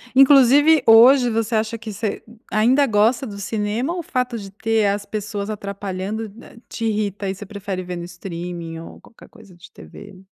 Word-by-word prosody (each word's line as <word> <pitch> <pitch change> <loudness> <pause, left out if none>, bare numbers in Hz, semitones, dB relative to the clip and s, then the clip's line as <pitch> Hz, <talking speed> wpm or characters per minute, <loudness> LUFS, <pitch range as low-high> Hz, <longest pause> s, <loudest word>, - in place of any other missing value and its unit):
Inclusive, 275 +3 +6
hoje 245 +3 +7
você 225 0 -1
acha 220 +1 -1
que 225 -1 -8
você 210 +1 -4 0.3
ainda 250 +7 +3
gosta 225 +5 +2
do 200 -2 -8
cinema, 215 - -2
ou 355 - -4
fato 250 -8 -3
de 200 -2 -8
ter 220 +2 0
as 200 0 -2
pessoas 205 0 -5
atrapalhando 200 +1 -5
na 230 - -15
te 230 - -5
irrita 205 -2 -2
e 190 - -3
você 205 - -10
prefere 195 -2 -6
ver 180 0 -6
no 170 - -6
streaming 175 -2 -7
ou 165 - -12
qualquer 230 - -18
coisa 220 -5 -18
de 175 +1 -16
TV? 200 -2 -13
215 Hz, 180 wpm, -20 LUFS, 200-235 Hz, 0.3 s, hoje